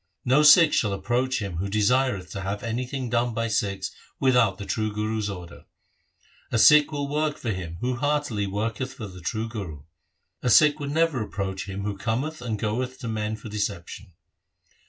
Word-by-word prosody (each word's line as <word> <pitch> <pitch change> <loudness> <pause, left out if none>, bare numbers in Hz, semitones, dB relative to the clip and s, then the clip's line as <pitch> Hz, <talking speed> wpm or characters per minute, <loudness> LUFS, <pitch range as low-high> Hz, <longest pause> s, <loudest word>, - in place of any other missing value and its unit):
No 130 +4 +4
Sikh 150 +1 +8
shall 105 -3 +2
approach 120 +3 -1
him 95 -4 -5
who 100 +3 -2
desireth 110 -2 +1
to 95 - -5
have 100 +1 -4
any 120 +2 -2
thing 130 -1 -4
done 120 0 0
by 115 0 0
Sikhs 100 -3 -1 0.3
without 125 -7 +3
the 100 - -7
true 110 0 -1
Guru's 105 0 -2
order. 90 -3 -9 0.9
A 115 - +1
Sikh 150 +6 +7
will 145 -1 -2
work 150 +1 -1
for 115 - -3
him 85 -4 -5
who 125 0 -1
heartily 145 -7 0
worketh 115 +6 -3
for 110 - -7
the 90 -2 -10
true 110 +6 -2
Guru. 95 -11 -7 0.6
A 125 - 0
Sikh 150 +4 +6
would 145 -1 -4
never 160 -3 +1
approach 95 -2 -4
him 100 +1 -5
who 105 0 -2
cometh 130 +9 -2
and 115 -3 -3
goeth 125 +5 -2
to 120 - -5
men 110 -1 -2
for 110 - -10
deception. 100 -2 -4
110 Hz, 185 wpm, -25 LUFS, 100-130 Hz, 0.9 s, Sikh